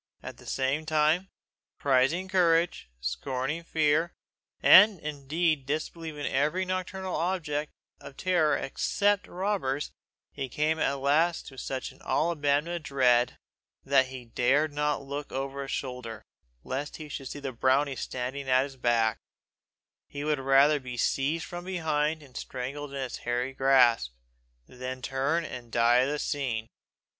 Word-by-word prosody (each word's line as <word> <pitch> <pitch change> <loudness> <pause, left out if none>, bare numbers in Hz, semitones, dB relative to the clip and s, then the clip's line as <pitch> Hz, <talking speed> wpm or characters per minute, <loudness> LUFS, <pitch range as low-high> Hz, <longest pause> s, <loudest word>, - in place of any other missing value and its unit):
At - - -8
the - - -15
same 135 +4 -1
time, 155 +4 +2 0.5
prizing 140 +7 +2
courage, 170 - +2
scorning 130 - -3
fear, 160 +1 +1 0.4
and 205 -3 +8
indeed 150 0 -1
disbelieving 155 0 -4
in - - -2
every 150 +8 +1
nocturnal 185 0 -3
object 155 -4 -1 0.3
of 140 - -12
terror 175 -5 +2
except 205 +8 0
robbers, 180 -8 -2 0.4
he 135 -2 -5
came 155 +5 0
at 140 - +2
last 150 +5 +2
to 135 - -15
such 130 -1 -4
an - - -20
all 170 +2 +1
but 160 - -13
abandonment 145 +4 +1
of 165 - -10
dread, 125 -3 +3 0.5
that 135 -1 +3
he 130 -2 -9
dared 140 +6 +1
not 150 -1 0
look 140 +1 -6
over 135 +1 -3
his 135 - -6
shoulder, 125 -4 -5 0.4
lest 140 +3 -4
he 155 - -8
should 140 -2 -6
see 145 - -6
the 140 -2 -4
brownie 130 +3 +2
standing 130 +2 -4
at 130 0 +5
his 135 -1 -8
back; 115 -2 +2 0.9
he 145 0 -6
would 150 -1 0
rather 135 +3 +4
be 125 -2 -7
seized 145 +7 0
from 175 0 -7
behind 160 -4 -1
and 130 -3 -18
strangled 135 +3 -5
in 140 - -5
his 130 -2 -4
hairy 125 +2 -2
grasp, 125 - +4 0.5
than 130 0 -7
turn 140 +5 0
and 120 -5 -8
die 120 +1 +4
of 130 +2 +3
the 150 - -1
seeing. 130 -7 -2
140 Hz, 150 wpm, -28 LUFS, 130-160 Hz, 0.9 s, and